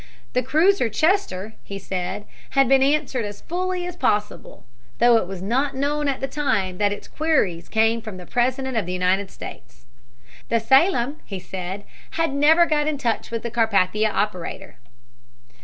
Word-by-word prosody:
The 250 - +2
cruiser 310 +2 +3
Chester, 220 - 0
he 200 - -7
said, 190 +1 -4 0.3
had 270 -1 +6
been 270 +1 +5
answered 275 -3 +1
as 205 -1 -7
fully 365 +1 -2
as 355 -1 -6
possible, 210 -10 -2 0.3
though 240 -1 +6
it 200 - -1
was 190 -1 -6
not 265 +7 0
known 290 +2 0
at 275 -2 -1
the 270 - -1
time 200 -11 -1
that 205 -1 +2
its 205 - -6
queries 235 - 0
came 225 +1 +2
from 215 -4 -8
the 180 - -10
President 255 +3 0
of 220 -6 0
the 180 - -3
United 185 +2 +1
States. 125 -7 -11 0.6
The 230 - +2
Salem, 265 - +3
he 195 - -6
said, 185 +2 -6 0.3
had 330 -3 +1
never 310 +4 +5
got 300 -2 +1
in 305 -2 0
touch 235 -5 -1
with 230 -1 -4
the 235 - -4
Carpathia 215 -2 +2
operator. 200 -9 -3
235 Hz, 170 wpm, -23 LUFS, 200-290 Hz, 0.6 s, had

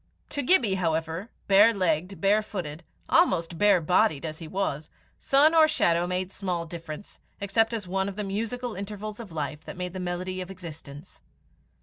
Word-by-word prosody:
To 285 - -1
Gibbie, 245 - +3
however, 165 +4 -1 0.2
bare 205 +3 +6
legged, 185 0 0
bare 205 +2 +3
footed, 175 -7 -6 0.2
almost 170 - +2
bare 205 -3 +5
bodied 170 -1 +2
as 155 -1 -5
he 165 - -8
was, 155 -5 -2 0.3
sun 290 +4 +4
or 320 -1 +7
shadow 175 - +2
made 185 +1 -2
small 180 -4 -3
difference, 165 +1 -9 0.2
except 225 +3 +1
as 220 -5 -4
one 190 +2 -1
of 195 - -8
the 210 - -3
musical 230 +5 -3
intervals 210 +2 -6
of 220 -6 -9
life 150 -1 -4
that - - -8
make 180 -1 -4
the 185 - -5
melody 180 +1 -3
of 180 - -7
existence. 165 -3 -10
185 Hz, 175 wpm, -27 LUFS, 170-210 Hz, 0.3 s, or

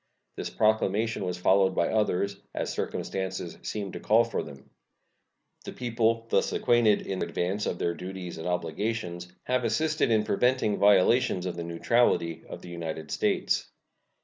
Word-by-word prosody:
This - - -4
proclamation 110 0 +1
was 90 -1 -2
followed 95 +1 +3
by 85 - +2
others, 100 -2 0 0.2
as - - -2
circumstances 95 -3 -4
seemed 100 -3 -4
to - - -5
call 110 +2 +4
for 115 - -2
them. 70 -3 -12 0.9
The - - -7
people, 115 -1 0
thus - - +2
acquainted 120 -3 +3
in 95 -1 -3
advance 95 +4 -1
of - - -2
their 85 - 0
duties 90 -1 -7
and 80 - -5
obligations, 90 +1 -3
have 125 0 0
assisted 155 +2 +1
in 110 -2 +3
preventing 125 0 +1
violations 100 -1 +4
of 90 - -3
the 85 - -4
neutrality 85 -1 +1
of - - -8
the 90 - -9
United 80 -2 -5
States. - - 0
95 Hz, 150 wpm, -28 LUFS, 85-115 Hz, 0.9 s, call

